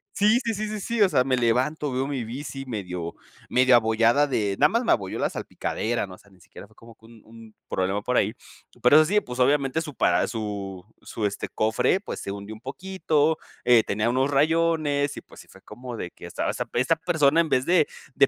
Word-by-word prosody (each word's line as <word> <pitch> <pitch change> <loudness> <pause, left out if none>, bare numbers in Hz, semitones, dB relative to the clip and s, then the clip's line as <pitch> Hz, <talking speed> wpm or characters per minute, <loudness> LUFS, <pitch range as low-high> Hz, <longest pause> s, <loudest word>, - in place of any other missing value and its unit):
Sí, 215 +4 +4
sí, 230 -1 -1
sí, 215 +1 -3
sí, 215 0 -4
sí, 230 +2 -2
o 190 - +4
sea, 125 - +3
me 130 -1 0
levanto, 130 +5 0
veo 130 +1 -1
mi 135 -4 -3
bici 135 +3 -6
medio 90 -8 -5 0.4
medio 130 0 +5
abollada 115 +4 +3
de, 105 -8 -1
nada 150 - +5
más 230 +2 0
me - - +1
abolló 95 -3 0
la - - +1
salpicadera, 115 -2 -3
¿no? 90 - -11
O - - -20
sea, 100 - -23
ni 95 - -22
siquiera 95 - -13
fue 110 - -25
como 115 +1 -16
que 110 - -22
un 115 -1 -16
un 110 -1 -15 0.2
problema 95 +2 -1
por 125 +3 -1
ahí. 105 +2 +2 0.5
Pero 125 +4 +6
eso 155 - +6
sí, 210 +5 +2
pues, 125 +1 -8
obviamente 140 +2 +2
su 150 -3 -7
para - - +2
su 100 -4 -5 0.2
su, 110 - -4
este, 100 - -5
cofre, 110 - +1
pues, - - -7
se 100 - -5
hundió 100 +2 -7
un 110 - -15
poquito, 160 -1 0 0.3
eh, 120 -2 +5
tenía 105 +3 -1
unos 130 +3 +1
rayones, 155 -1 +1
y, - - -6
pues, - - -15
sí - - -19
fue - - -17
como 125 -1 -9
de 90 - -5
que - - -13
estaba 85 - -3
esa - - -3
esta 130 +7 +2
persona 160 -2 +2
en 160 - -2
vez 130 0 +1
de 175 - +2 0.4
de 140 - +5
125 Hz, 230 wpm, -25 LUFS, 110-150 Hz, 0.5 s, Pero